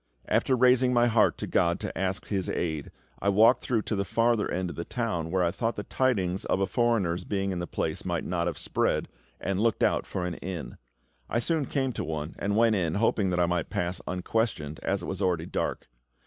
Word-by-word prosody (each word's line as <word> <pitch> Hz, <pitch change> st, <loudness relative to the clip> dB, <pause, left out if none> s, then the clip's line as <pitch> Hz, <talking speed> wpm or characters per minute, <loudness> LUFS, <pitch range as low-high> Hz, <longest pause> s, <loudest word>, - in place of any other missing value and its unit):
After 130 Hz, -, +2 dB
raising 125 Hz, 0 st, +4 dB
my 120 Hz, 0 st, +5 dB
heart 115 Hz, -2 st, +3 dB
to -, -, -4 dB
GOD 85 Hz, 0 st, +1 dB
to -, -, -4 dB
ask 95 Hz, 0 st, -1 dB
His 95 Hz, -3 st, -2 dB
aid, 80 Hz, -4 st, -2 dB, 0.3 s
I 100 Hz, -, +1 dB
walked 110 Hz, +5 st, +5 dB
through 115 Hz, -4 st, 0 dB
to 110 Hz, -, -2 dB
the 100 Hz, -, 0 dB
farther 115 Hz, +2 st, +1 dB
end 90 Hz, -1 st, -2 dB
of -, -, -9 dB
the 85 Hz, -, -4 dB
town, 90 Hz, -8 st, -2 dB
where 95 Hz, +1 st, +1 dB
I 85 Hz, -, +2 dB
thought 115 Hz, +4 st, -1 dB
the 105 Hz, -, -4 dB
tidings 95 Hz, -9 st, 0 dB
of -, -, +1 dB
a 95 Hz, -, +2 dB
foreigner's 95 Hz, -5 st, +1 dB
being 100 Hz, 0 st, -1 dB
in 90 Hz, -, -2 dB
the 85 Hz, -, -3 dB
place -, -, -2 dB
might -, -, -1 dB
not 85 Hz, -1 st, -1 dB
have 85 Hz, -4 st, -2 dB
spread, -, -, 0 dB, 0.3 s
and 95 Hz, +1 st, -1 dB
looked 115 Hz, -1 st, +2 dB
out -, -, +2 dB
for 90 Hz, -, -3 dB
an 90 Hz, -, -2 dB
inn. 85 Hz, -10 st, -6 dB, 0.5 s
I -, -, 0 dB
soon 155 Hz, +4 st, 0 dB
came 135 Hz, -3 st, -1 dB
to -, -, -3 dB
one, 75 Hz, 0 st, -4 dB
and 100 Hz, +1 st, 0 dB
went 115 Hz, -1 st, +4 dB
in, 85 Hz, -5 st, 0 dB
hoping 105 Hz, -2 st, +2 dB
that 90 Hz, -1 st, 0 dB
I 90 Hz, -, +4 dB
might 85 Hz, -2 st, -1 dB
pass 90 Hz, +1 st, -2 dB
unquestioned, 90 Hz, -4 st, -1 dB
as 95 Hz, -2 st, -1 dB
it -, -, -4 dB
was 95 Hz, +1 st, -4 dB
already 90 Hz, -4 st, +1 dB
dark. -, -, -3 dB
95 Hz, 225 wpm, -28 LUFS, 85-115 Hz, 0.5 s, my